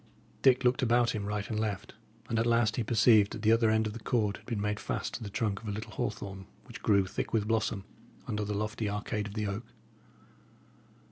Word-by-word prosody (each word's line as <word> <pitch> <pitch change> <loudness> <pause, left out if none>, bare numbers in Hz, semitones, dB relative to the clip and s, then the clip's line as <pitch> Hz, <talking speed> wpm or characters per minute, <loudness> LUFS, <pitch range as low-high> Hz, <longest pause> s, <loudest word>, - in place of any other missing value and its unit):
Dick 130 -1 +5
looked 125 0 +3
about 120 -1 +3
him 105 -2 -3
right 105 0 -2
and 110 - -2
left; 105 -3 -3 0.3
and 115 - 0
at 115 - +2
last 115 -1 +3
he 120 - 0
perceived 110 -2 +5
that 110 - -7
the 110 - +5
other 115 0 +4
end 110 0 +3
of 105 - -3
the 115 - -7
cord 105 -3 0
had - - -20
been 115 -4 -2
made 105 +1 -1
fast - - -3
to 120 - -5
the 105 - -5
trunk 105 -1 -1
of 110 - -9
a - - -1
little 110 +2 -5
hawthorn 100 -5 -4 0.2
which - - -10
grew, 100 -2 +4
thick 95 - -4
with 105 -2 +1
blossom, 110 -3 0 0.4
under 105 0 -2
the 105 0 -2
lofty 110 +1 -2
arcade 105 +1 -2
of 105 - -9
the 105 -1 -1
oak. 100 +4 -4
110 Hz, 225 wpm, -30 LUFS, 105-115 Hz, 0.4 s, Dick